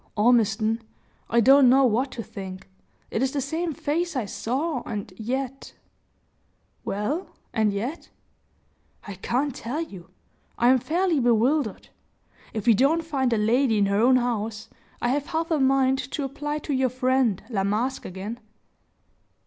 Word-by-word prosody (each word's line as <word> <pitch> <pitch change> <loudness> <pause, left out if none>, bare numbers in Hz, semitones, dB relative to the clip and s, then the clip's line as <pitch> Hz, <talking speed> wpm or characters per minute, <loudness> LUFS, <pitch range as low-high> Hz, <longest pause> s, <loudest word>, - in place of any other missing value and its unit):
"Ormiston, 220 0 +3 0.5
I 235 - +4
don't 270 +2 +7
know 265 +2 +5
what 250 +3 +1
to 230 - -5
think. 190 -2 -8 0.4
It 220 - -1
is 265 0 0
the 290 - 0
same 320 +5 -2
face 320 +3 -2
I 250 -5 -1
saw, 255 - -2
and 205 -4 -6
yet 260 +5 -4 0.5
" - - -43
"Well 260 - -2 0.3
and 215 -2 +2
yet 235 +11 -4 0.5
" - - -26
"I 200 - -5
can't 250 +9 -1
tell 245 +8 -4
you 190 - -7 0.5
I 240 - +4
am 260 0 +5
fairly 340 +3 +1
bewildered. 240 0 +1 0.6
If 215 -3 -4
we 235 - +6
don't 285 +9 +3
find 270 -6 0
the 230 - +2
lady 225 +2 +2
at 200 -1 +2
her 200 +1 +2
own 255 +2 +5
house, 225 -3 -1 0.3
I 240 - +2
have 285 +3 0
half 330 0 -2
a 315 - +2
mind 265 0 +3
to 295 - -2
apply 295 +2 -3
to 290 - -1
your 260 -1 +2
friend, 255 -4 +1
La 195 -4 0
Masque, 225 +7 -1
again." 200 +6 -6
250 Hz, 160 wpm, -25 LUFS, 220-275 Hz, 0.6 s, don't